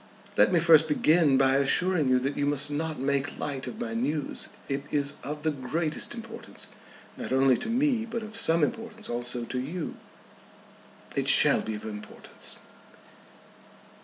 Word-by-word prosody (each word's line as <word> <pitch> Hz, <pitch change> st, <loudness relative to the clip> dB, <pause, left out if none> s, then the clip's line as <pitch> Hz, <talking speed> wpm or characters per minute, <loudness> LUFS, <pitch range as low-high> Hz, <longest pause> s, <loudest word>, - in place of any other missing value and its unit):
"Let -, -, +5 dB
me 175 Hz, -, +4 dB
first 160 Hz, -1 st, +6 dB
begin 155 Hz, -2 st, +4 dB
by 135 Hz, 0 st, +4 dB
assuring 155 Hz, +2 st, +2 dB
you, 130 Hz, -, +4 dB
that 140 Hz, +2 st, -2 dB
you 145 Hz, -, 0 dB
must 145 Hz, 0 st, -1 dB
not 155 Hz, +1 st, -2 dB
make 140 Hz, +1 st, -1 dB
light 135 Hz, -3 st, -4 dB
of 220 Hz, -, -7 dB
my 235 Hz, -1 st, -4 dB
news. 155 Hz, -, -2 dB, 0.2 s
It 140 Hz, 0 st, -2 dB
is 140 Hz, -1 st, 0 dB
of 150 Hz, +2 st, -6 dB
the 160 Hz, -, +2 dB
greatest 150 Hz, -, -1 dB
importance, 230 Hz, 0 st, -8 dB, 0.5 s
not -, -, -6 dB
only 130 Hz, 0 st, +4 dB
to -, -, -5 dB
me, 245 Hz, -2 st, +1 dB
but 230 Hz, 0 st, -4 dB
of 215 Hz, 0 st, -7 dB
some 165 Hz, -8 st, +3 dB
importance 225 Hz, -, -3 dB
also 120 Hz, 0 st, -2 dB
to 125 Hz, -, -3 dB
you." 155 Hz, +6 st, -5 dB, 1.2 s
"It -, -, 0 dB
shall -, -, +7 dB
be 110 Hz, -, -4 dB
of 105 Hz, -, -8 dB
importance." 105 Hz, -1 st, -8 dB
150 Hz, 160 wpm, -27 LUFS, 135-210 Hz, 1.2 s, shall